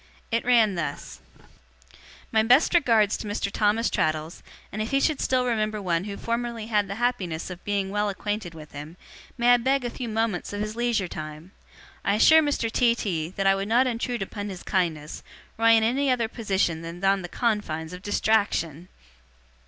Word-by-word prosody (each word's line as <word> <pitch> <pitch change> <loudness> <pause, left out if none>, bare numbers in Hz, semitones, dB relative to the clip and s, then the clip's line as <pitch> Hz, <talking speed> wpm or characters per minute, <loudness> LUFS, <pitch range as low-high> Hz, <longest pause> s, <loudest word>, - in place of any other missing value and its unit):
It 230 +1 +1
ran 230 -4 +4
thus: 170 -3 -5 1.1
'My 220 - +4
best 250 +10 +4
regards 230 - +3
to 215 - -7
Mr. 205 -1 -2
Thomas 215 +3 +1
Traddles, 155 +1 -1 0.3
and 215 - -4
if 215 - -2
he 275 - +2
should 300 0 +1
still 255 -1 +1
remember 215 -3 -1
one 180 -2 -1
who 200 -1 -6
formerly 235 -1 -3
had 210 -3 +1
the 200 - -5
happiness 200 -9 -2
of 180 -1 -9
being 200 -2 -1
well 205 0 0
acquainted 205 -3 -4
with 155 -1 -11
him, 150 +4 -9 0.4
may 240 0 +5
I - - +6
beg 260 +2 0
a 240 - -2
few 240 -1 -5
moments 220 -4 -2
of 205 - -3
his 215 +1 -4
leisure 235 -5 0
time? 155 +2 -8 0.5
I 200 - +2
assure 315 +9 +7
Mr. 285 -7 -1
T. 235 0 +3
T. 165 -8 -2
that 195 - 0
I 195 - +6
would 195 +1 -2
not 240 +4 +4
intrude 240 -2 -2
upon 205 +1 -6
his 185 -2 -8
kindness, 160 -5 -2 0.3
were 225 - -2
I 230 - +7
in 225 -1 +4
any 265 +5 +1
other 245 -3 +1
position 195 -8 -1
than 170 +2 -8
on 195 0 +3
the 175 - -7
confines 180 -9 -2
of 180 - -8
distraction. 200 -6 0
210 Hz, 190 wpm, -25 LUFS, 185-235 Hz, 1.1 s, assure